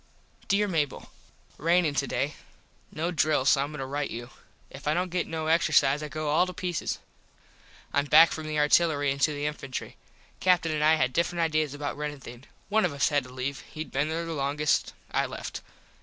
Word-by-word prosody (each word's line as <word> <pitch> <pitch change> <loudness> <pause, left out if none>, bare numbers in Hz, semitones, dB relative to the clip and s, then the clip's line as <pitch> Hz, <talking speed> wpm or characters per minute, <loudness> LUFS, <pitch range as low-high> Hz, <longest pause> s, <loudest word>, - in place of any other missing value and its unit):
Dere 205 +1 +2
Mable: 155 -7 -2 0.5
Rainin 165 -1 +3
today. 140 +1 -1 0.6
No 165 +3 -2
drill 155 -5 +2
so 140 0 +4
Im 145 +2 -6
going - - -6
to - - -3
rite 140 +2 -2
you. 120 +3 -7 0.4
If 140 +1 -9
I 150 - +2
dont 180 0 -1
get 180 0 -1
no 160 -1 -3
exercise 155 -3 +3
I 150 - -4
go 155 -1 -3
all 160 +5 +3
to 185 - -7
pieces. 180 -2 -2 1.0
Im 145 0 +2
back 160 +3 +7
from 155 -1 -5
the 155 0 -2
artillery 150 -1 +3
into 140 +3 +2
the 145 0 -3
infantry. 135 -4 -5 0.4
Captin 180 -3 +3
an 155 -1 -1
I 155 +1 +5
had 130 -4 0
different 170 +2 0
ideas 155 -3 0
about 145 0 -4
runnin 150 -1 -4
things. 120 0 -12 0.2
One 220 +1 +2
of 175 - 0
us 140 0 +2
had 145 -3 +1
to - - -12
leave. 130 +2 -4
Hed 155 0 -6
been 145 +3 0
there 165 +1 -2
longest. 150 -1 0 0.2
I - - +1
left. - - -6
150 Hz, 195 wpm, -27 LUFS, 140-165 Hz, 1.0 s, back